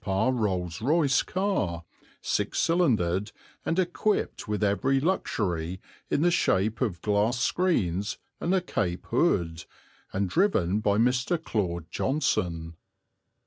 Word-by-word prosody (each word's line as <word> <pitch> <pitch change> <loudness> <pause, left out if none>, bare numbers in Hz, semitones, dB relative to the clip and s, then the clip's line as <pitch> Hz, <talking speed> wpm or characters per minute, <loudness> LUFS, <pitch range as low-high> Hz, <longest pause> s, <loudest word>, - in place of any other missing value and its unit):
p. - - -6
Rolls 95 -5 0
Royce 145 +2 +3
car, 185 - -1 0.4
six - - -1
cylindered 105 - +2 0.3
and 165 - -1
equipped 185 - 0
with 105 0 -1
every 130 +7 +2
luxury 95 - -1 0.3
in 145 - +1
the 175 - +4
shape 110 - +1
of 95 -10 -1
glass 105 +4 +1
screens 105 - 0 0.2
and 170 - -1
a 185 - +2
cape 90 - -2
hood, 90 - +1 0.5
and 95 0 0
driven 105 - +2
by 105 -1 +1
Mr. 125 +8 +2
Claude 90 - -2
Johnson. 85 - -1
105 Hz, 120 wpm, -27 LUFS, 90-150 Hz, 0.5 s, the